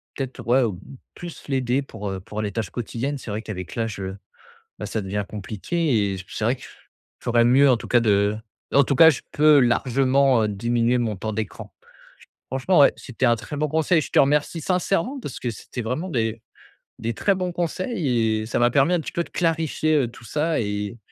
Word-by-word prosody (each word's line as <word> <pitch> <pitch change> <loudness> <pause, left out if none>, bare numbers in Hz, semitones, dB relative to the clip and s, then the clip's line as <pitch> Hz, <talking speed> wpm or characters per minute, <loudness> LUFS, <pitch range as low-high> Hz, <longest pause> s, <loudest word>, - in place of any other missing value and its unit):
peut-être, 135 -1 -5
ouais, 130 +2 +4
heu, 115 - +2 0.5
plus 175 -2 -9
l'aider 130 0 +1
pour, 105 -6 -7
heu, 95 -1 -4
pour 110 +1 -5
les 105 -1 -2
tâches 110 -4 -3
quotidiennes. 125 +4 -3
C'est 125 - -9
vrai, 105 +1 -3
qu'avec 90 -6 -7
l'âge, 115 -4 -3
heu 95 0 -5 0.6
bah, - - -3
ça 110 - -2
devient 100 +1 -3
compliqué 110 - -1
et - - -3
c'est 110 - -4
vrai 125 +4 +2
que - - -17
je - - -9 0.6
ferais 120 -1 +3
mieux, 135 +3 +5
en 125 - +4
tout - - -8
cas, 120 - +4
de 105 -1 +2 0.4
en 140 - +7
tout 140 0 0
cas, 160 - +9
je 140 - -3
peux 150 -1 +5
largement, 130 +1 +3
heu, 105 - +1
diminuer 120 +4 +1
mon 115 -3 -1
temps 110 +3 -4
d'écran. 110 -1 -5 0.8
Franchement, 135 +8 +2
ouais, 140 - +7
c'était 130 -1 -2
un 120 -1 +4
très 145 +6 -7
bon 150 +1 0
conseil. 160 +2 +2
Je - - -6
te - - +2
remercie 150 +4 +2
sincèrement 195 - 0
parce 140 - -6
que 120 - -3
c'était 115 +2 -7
vraiment 130 +11 -3
des 115 -6 -1 0.6
des 115 +1 -3
très 200 - +2
bons 185 -1 -2
conseils 155 - -1
et 110 - -4
ça - - -1
m'a 120 0 +4
permis 140 +6 +3
un 175 - +2
petit - - -7
peu 170 - -1
de - - -17
clarifier, 160 -2 0
heu, 135 -6 +2
tout 120 - -15
ça 155 +3 0
et 105 +1 -3
125 Hz, 215 wpm, -23 LUFS, 110-150 Hz, 0.8 s, cas